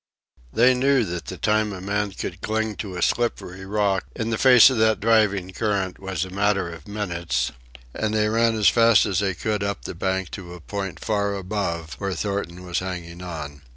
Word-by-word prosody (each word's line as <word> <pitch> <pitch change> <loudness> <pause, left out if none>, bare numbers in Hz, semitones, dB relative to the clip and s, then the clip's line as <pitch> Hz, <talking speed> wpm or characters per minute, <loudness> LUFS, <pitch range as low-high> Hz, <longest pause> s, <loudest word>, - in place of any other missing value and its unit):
They 125 - +5
knew 130 -1 +3
that 90 -2 -5
the - - -6
time 105 0 +1
a 95 - -6
man 100 +1 -2
could 90 0 -6
cling 110 -1 -1
to 95 -4 -5
a 90 - 0
slippery 95 -6 -1
rock 100 -1 +1
in 115 0 -2
the 110 - 0
face 130 -1 +8
of 125 - -1
that 110 0 +3
driving 105 -4 +2
current 100 -3 -1
was 95 -3 -3
a 95 - -10
matter 100 -2 +1
of 80 -2 -12
minutes, 90 -5 -2 0.4
and 110 -1 -1
they 105 0 +2
ran 115 +1 +2
as 105 -2 +3
fast 115 -2 +5
as 95 -5 0
they 95 -2 0
could 105 -2 -2
up 100 0 -3
the - - -4
bank 95 +1 -2
to 90 -3 -8
a - - -11
point 95 +2 -5
far 100 -2 -1
above 90 -5 -3
where 100 -1 -2
Thornton 90 -2 -3
was 90 -1 -1
hanging 90 -2 -6
on. 75 -5 -7
100 Hz, 200 wpm, -23 LUFS, 90-110 Hz, 0.4 s, face